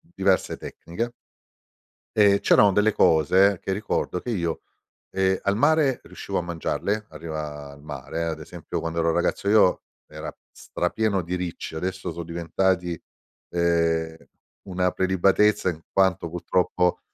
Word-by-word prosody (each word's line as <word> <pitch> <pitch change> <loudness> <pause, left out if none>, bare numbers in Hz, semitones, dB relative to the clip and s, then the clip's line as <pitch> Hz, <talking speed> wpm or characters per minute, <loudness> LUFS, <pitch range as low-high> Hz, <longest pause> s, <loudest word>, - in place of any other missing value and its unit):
diverse 95 -1 +2
tecniche. 115 +8 -5 1.0
E, 100 -1 +5
c'erano 100 -2 +5
delle 105 +2 +3
cose, 95 +5 +4
che 95 - -2
ricordo 95 -2 -1
che 120 - -5
io, 85 -6 -2 0.5
ehm, 95 0 +1
al 100 0 +1
mare 145 -1 +3
riuscivo - - -5
a - - +1
mangiarle; 100 +5 -2
a 80 - -10
riva 75 -3 -6
al 70 0 -14
mare, 75 +2 -5
ad 80 - -3
esempio, - - -6
quando 85 0 -3
ero 85 0 +2
ragazzo 100 - 0
io, 105 -4 +5 0.2
era - - -8 0.2
strapieno 100 +1 -1
di 90 +2 -3
ricci, 90 -2 -5
adesso 95 +1 -3
sono 85 +1 -6
diventati, 85 +1 -1 0.5
ehm, 85 -1 +1 0.5
una 90 -1 0
prelibatezza 95 +2 +3
in 80 -2 -5
quanto 95 -3 +2
purtroppo 90 +1 0
90 Hz, 135 wpm, -25 LUFS, 85-100 Hz, 1.0 s, E